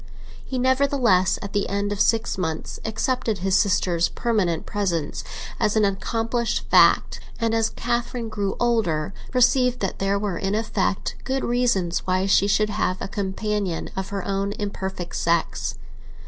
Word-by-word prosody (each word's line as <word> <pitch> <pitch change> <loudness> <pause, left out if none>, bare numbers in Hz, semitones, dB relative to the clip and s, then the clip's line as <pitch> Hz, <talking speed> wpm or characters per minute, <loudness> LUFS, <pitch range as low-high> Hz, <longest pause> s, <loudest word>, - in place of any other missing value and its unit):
He, 260 - -4
nevertheless, 250 -8 +3
at 200 - -7
the 205 - 0
end 200 +1 -1
of 205 - -1
six 225 -1 +2
months, 160 -4 -3
accepted 225 0 -1
his 190 +1 +1
sister's 185 -4 +2
permanent 195 -9 0
presence 180 -8 -2 0.4
as 210 - +1
an 215 -1 +4
accomplished 225 +4 -1
fact, - - +5 0.2
and 230 -1 +1
as 225 -1 +2
Catherine 240 0 -2
grew 205 -3 -2
older 205 -10 +1 0.2
perceived 250 0 +3
that 195 - -2
there 195 +1 +1
were 200 -4 -2
in 195 +1 -1
effect 210 -3 -1
good 265 0 -1
reasons 235 -8 +1
why 185 +1 +1
she 195 0 +4
should 210 +1 +2
have 190 -3 0
a - - -4
companion 200 -2 -2
of 190 0 -3
her 200 -2 -4
own 200 0 -1
imperfect 190 -4 -5
sex. 170 -1 0
205 Hz, 150 wpm, -23 LUFS, 190-230 Hz, 0.4 s, fact